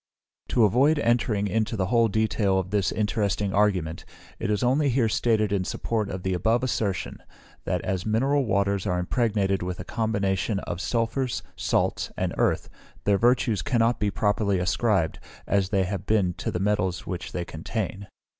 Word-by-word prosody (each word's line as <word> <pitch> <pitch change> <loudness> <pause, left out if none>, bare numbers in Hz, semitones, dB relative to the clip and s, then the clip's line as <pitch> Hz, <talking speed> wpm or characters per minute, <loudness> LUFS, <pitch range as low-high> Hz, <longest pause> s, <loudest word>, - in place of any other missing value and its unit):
To 120 - +3
avoid 130 +9 +4
entering 115 -4 +1
into 110 +2 -1
the 95 - +1
whole 115 +3 +3
detail 105 -2 +1
of 95 -1 -2
this 100 -2 +1
interesting 105 -2 0
argument, 95 -6 +1 0.4
it - - -2
is 105 +1 0
only 140 +4 +3
here 125 -2 +2
stated 110 -2 +1
in 100 -2 +1
support 110 +2 -2
of 95 -1 -5
the 95 - 0
above 110 +7 +1
assertion, 100 -7 -2 0.5
that - - -1
as 95 -1 -2
mineral 135 +6 +1
waters 100 -2 +1
are 90 - +1
impregnated 100 0 0
with 90 0 -4
a - - -4
combination 105 -1 -1
of 85 - -5
sulphurs, 120 +3 -1
salts, - - 0
and - - -1
earth, - - +1 0.4
their 100 -1 +2
virtues 120 -3 +2
cannot 120 -1 +1
be 105 - +1
properly 105 0 +1
ascribed, 90 -1 +1 0.3
as 100 -2 +1
they 100 -2 +2
have 95 +1 -4
been, 100 -5 +2
to - - -2
the 90 - -2
metals 95 -3 0
which 90 -2 -5
they 85 - -3
contain. 100 +4 -4
105 Hz, 170 wpm, -26 LUFS, 95-115 Hz, 0.5 s, avoid